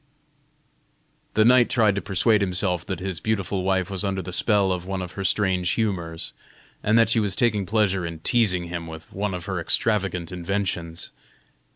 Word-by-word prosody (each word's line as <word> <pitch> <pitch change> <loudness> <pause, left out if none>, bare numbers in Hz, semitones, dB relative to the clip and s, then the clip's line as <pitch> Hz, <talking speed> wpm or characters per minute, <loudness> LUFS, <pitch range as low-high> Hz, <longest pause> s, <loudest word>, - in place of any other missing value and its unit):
The 110 - +5
knight 125 0 +5
tried 110 -4 +3
to 100 - -2
persuade 100 +4 +2
himself 90 -2 0
that 95 -4 -3
his 95 -3 -4
beautiful 100 -2 -1
wife 95 0 0
was 95 0 0
under 95 -2 -2
the 90 +1 -3
spell 100 -1 +3
of 90 -1 -2
one 95 0 -3
of 90 -2 -5
her 100 - -5
strange 95 -2 +1
humors, 85 -7 -2 0.5
and 110 +2 +3
that 115 -2 +5
she 115 - +3
was 100 -3 0
taking 105 -5 +1
pleasure 100 -3 +1
in 85 -1 -5
teasing 100 -5 +2
him 85 -1 -5
with 80 -1 -10
one 100 -1 -2
of 90 - -6
her 95 -3 -3
extravagant 90 -1 0
inventions. 90 -2 -3
95 Hz, 180 wpm, -24 LUFS, 90-105 Hz, 0.5 s, The